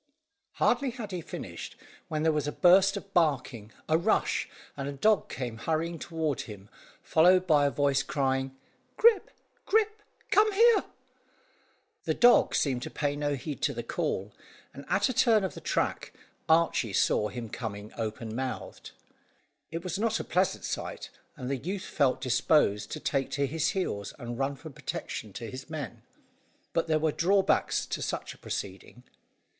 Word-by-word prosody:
Hardly 275 - +2
had 235 -4 -7
he 180 -2 -3
finished, - - -7 0.3
when 155 0 -2
there 160 - +4
was 150 -2 -1
a - - -1
burst 190 +4 +5
of 200 0 -10
barking, 130 -9 0 0.2
a 160 +1 +3
rush, - - +1 0.3
and 140 0 -4
a - - -4
dog 210 +9 +2
came 120 -4 -5
hurrying 165 +5 -2
toward 160 -5 -2
him, 105 -2 -10 0.3
followed 180 +3 +5
by 150 -4 +4
a - - +2
voice 140 -1 +2
crying 135 -1 -1 0.4
"Grip, 455 -3 +5 0.4
Grip, 430 0 +2 0.3
come 430 +1 +5
here!" 460 +2 +5 1.2
The - - 0
dog 245 0 +5
seemed 130 -4 +1
to - - -5
pay 145 -1 -1
no 145 0 -1
heed 140 0 -6
to - - 0
the - - -4
call, 100 +2 -2 0.4
and 140 - -10
at 200 - +3
a 255 - -2
turn 225 -3 +4
of 190 - -2
the - - -9
track, - - -1 0.4
Archy 160 -9 +3
saw 105 +2 +2
him 120 +1 -6
coming 105 -2 -6
open 110 0 -4
mouthed. 130 +1 -5 0.8
It 165 +1 -5
was 185 +1 -3
not 225 0 +1
a - - -3
pleasant 185 +1 0
sight, - - -5 0.3
and 125 - -6
the 135 +1 -1
youth 185 +9 -4
felt 140 -5 +1
disposed 125 -5 +2
to 155 - -4
take 135 -2 -1
to 140 0 +1
his 160 +3 0
heels, 100 - -3
and 120 -2 -6
run 135 +1 0
for 155 +3 -10
protection 110 -4 -5
to 115 +1 -6
his 130 +4 -8
men. 140 -7 -6 0.7
But 165 - +1
there 155 -1 +3
were 155 0 +1
drawbacks 190 +5 +2
to - - -4
such - - -3
a - - -20
proceeding. 100 +5 -6
150 Hz, 170 wpm, -29 LUFS, 125-180 Hz, 1.2 s, burst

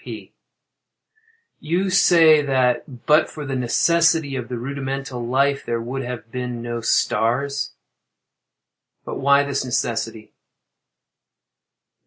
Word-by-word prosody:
P. - - -9 1.3
You 180 +5 -1
say 165 -4 +6
that 130 -2 -1
"but 155 +1 +4
for 150 -2 -8
the 135 -1 -3
necessity 160 +4 +2
of 125 -2 -5
the 125 - -4
rudimental 135 0 -5
life" 135 +3 +1
there 115 0 -2
would 125 +4 -4
have 120 -3 -7
been 125 -2 -5
no 120 0 -4
stars. 125 +5 0 1.3
But - - -5
why 140 +1 +4
this 140 -1 -2
necessity? 115 -3 -3
135 Hz, 110 wpm, -21 LUFS, 120-140 Hz, 1.3 s, say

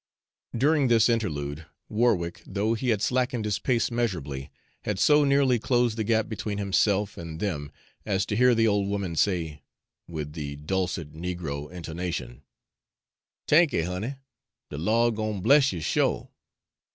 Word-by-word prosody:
During 145 +2 +3
this 115 -1 +4
interlude, 80 -9 -2 0.2
Warwick, 95 -7 0
though 105 +3 0
he 120 +2 -2
had 110 -3 +1
slackened 125 -2 0
his 105 -1 -1
pace 120 0 +1
measurably, 80 - -2 0.3
had 105 -2 -2
so 150 +7 +5
nearly 140 -3 +3
closed 120 -1 +1
the 110 - -1
gap 110 0 +1
between 105 -2 -4
himself 100 0 +1
and 80 -1 -7
them 75 -8 -3 0.3
as 100 -2 0
to 105 - -2
hear 125 +2 +5
the 115 0 +3
old 100 -2 +1
woman 100 -4 -2
say, 80 -5 0 0.5
with 75 -3 -5
the 75 -3 -5
dulcet 85 0 -3
negro 80 -4 -4
intonation: 85 -8 -5 1.1
"T'anky', 150 - +4
honey; 95 +9 -4 0.6
de 75 - -5
Lawd 115 +5 +2
gwine 110 -2 -2
bless 135 +7 +5
you 85 -4 -5
sho'. - - 0
100 Hz, 145 wpm, -26 LUFS, 85-115 Hz, 1.1 s, so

